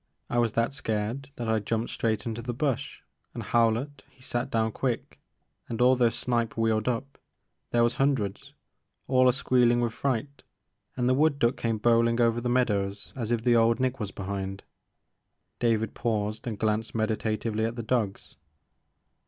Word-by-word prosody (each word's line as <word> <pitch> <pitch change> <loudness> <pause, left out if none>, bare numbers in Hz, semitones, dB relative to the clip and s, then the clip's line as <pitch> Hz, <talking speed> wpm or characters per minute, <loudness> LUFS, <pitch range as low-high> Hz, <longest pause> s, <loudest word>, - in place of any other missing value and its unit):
I 120 - +2
was 115 -2 +1
that 115 +4 +1
scared 115 +1 -2
that 120 - -4
I 110 0 +2
jumped 110 +2 -2
straight 110 -2 -1
into 115 0 -3
the 120 0 -4
bush 135 -1 -2 0.3
and - - -4
Howlett 120 +5 +1
he 135 - -28
sat 125 +1 -2
down 110 -2 +1
quick, 125 +1 -3 0.5
and 115 - -4
all 125 +1 +5
those 120 -3 +2
snipe 120 -2 -1
wheeled 110 -1 +1
up 130 +3 -2 0.3
— - - -52
there 120 0 +3
was 120 - +2
hun 140 +1 +4
dreds—all 130 +4 -2
a - - +6
squeeHn' 120 -1 +3
with 120 -2 0
fright, 140 +2 -2 0.6
and 125 -1 +1
the 130 - +4
wood 145 +2 +3
duck 120 -2 +2
came 115 -1 -1
bowlin' 115 +1 +3
over 115 0 +3
the 120 - -1
meadows 100 -5 0
as 115 -5 -3
if 120 -2 0
the 120 -1 +4
old 115 +1 +4
Nick 130 0 0
was 105 -4 -3
behind." 95 0 -5 1.0
David 110 -2 +1
paused 110 -1 -2
and 110 -3 -3
glanced 110 +1 -1
meditatively 110 0 -1
at 115 +1 -3
the 115 - -4
dogs. 110 -4 -2
115 Hz, 175 wpm, -27 LUFS, 110-125 Hz, 1.0 s, a